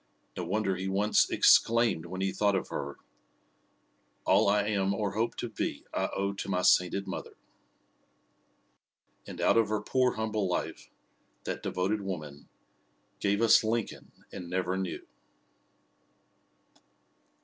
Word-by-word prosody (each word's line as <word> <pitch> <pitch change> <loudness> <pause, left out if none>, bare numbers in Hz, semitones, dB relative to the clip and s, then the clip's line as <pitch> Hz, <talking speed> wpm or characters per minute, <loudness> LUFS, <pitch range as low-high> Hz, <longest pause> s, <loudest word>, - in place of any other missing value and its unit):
No 90 - -4
wonder 95 +1 0
he 95 +1 -4
once 100 +2 +2
exclaimed 115 -8 +4
when 95 +2 -6
he 95 0 0
thought 100 +1 +1
of 95 - -2
her: 70 0 -5 1.3
"All - - +4
I 105 +1 +3
am 100 -2 0
or 105 -1 -2
hope 110 +3 -1
to 120 - -4
be 110 - -4
I - - -1
owe 100 0 -1
to 100 - -6
my 90 -1 0
sainted 90 +2 +3
mother." - - -7 1.9
And - - -8
out - - +3
of 115 -2 +3
her 110 -1 0
poor, 125 +2 +1
humble 110 -4 -2
life, 90 - -4 0.5
that - - -4
devoted 100 +3 -1
woman 75 -7 -7 0.7
"Gave 100 +2 +1
us 115 - +6
Lincoln 110 0 -3 0.2
and 90 -3 -8
never 90 0 -1
knew!" 95 -2 -4
100 Hz, 135 wpm, -29 LUFS, 95-110 Hz, 1.9 s, us